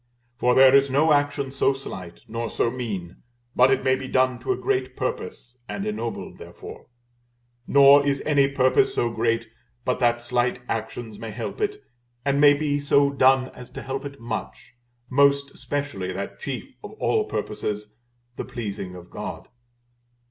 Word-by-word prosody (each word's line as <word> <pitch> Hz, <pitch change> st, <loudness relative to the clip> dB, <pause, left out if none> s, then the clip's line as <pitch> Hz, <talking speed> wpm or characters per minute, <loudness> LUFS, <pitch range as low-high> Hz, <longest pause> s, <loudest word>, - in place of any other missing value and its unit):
For 125 Hz, 0 st, +2 dB
there 135 Hz, 0 st, +7 dB
is 140 Hz, 0 st, +5 dB
no 150 Hz, +4 st, +4 dB
action 145 Hz, -2 st, 0 dB
so 135 Hz, 0 st, +2 dB
slight, 95 Hz, -10 st, -9 dB
nor 115 Hz, +1 st, -3 dB
so 115 Hz, -, 0 dB
mean, 105 Hz, -9 st, -5 dB, 0.4 s
but 125 Hz, +1 st, +6 dB
it 135 Hz, -1 st, +2 dB
may 130 Hz, 0 st, +3 dB
be 130 Hz, 0 st, -6 dB
done 130 Hz, -1 st, +2 dB
to -, -, -2 dB
a 385 Hz, -, 0 dB
great 400 Hz, -1 st, -1 dB
purpose, 450 Hz, -, -5 dB
and 200 Hz, -, -4 dB
ennobled 210 Hz, -, -4 dB
therefore; -, -, -11 dB, 0.8 s
nor 140 Hz, 0 st, +7 dB
is 140 Hz, -1 st, +1 dB
any 140 Hz, -2 st, +4 dB
purpose 130 Hz, -2 st, +2 dB
so 120 Hz, -, +1 dB
great 115 Hz, 0 st, 0 dB, 0.4 s
but 125 Hz, -, 0 dB
that 120 Hz, -1 st, +2 dB
slight 120 Hz, 0 st, 0 dB
actions 110 Hz, 0 st, -4 dB
may 115 Hz, -, -6 dB
help 110 Hz, -, -6 dB
it, 415 Hz, 0 st, -2 dB, 0.4 s
and 140 Hz, 0 st, +2 dB
may 145 Hz, -1 st, +7 dB
be 145 Hz, -1 st, 0 dB
so 140 Hz, 0 st, +3 dB
done 130 Hz, -1 st, +4 dB
as 125 Hz, -, -12 dB
to -, -, -8 dB
help 135 Hz, 0 st, -4 dB
it 140 Hz, -1 st, -8 dB
much, 115 Hz, -1 st, -6 dB, 0.3 s
most 140 Hz, +1 st, +3 dB
especially 130 Hz, -9 st, -4 dB
that 100 Hz, +2 st, -6 dB
chief -, -, -6 dB
of -, -, -8 dB
all -, -, +1 dB
purposes, 105 Hz, 0 st, -4 dB, 0.4 s
the -, -, -3 dB
pleasing 100 Hz, -5 st, -6 dB
of 90 Hz, -1 st, -12 dB
God. -, -, -7 dB
130 Hz, 165 wpm, -24 LUFS, 115-140 Hz, 0.8 s, there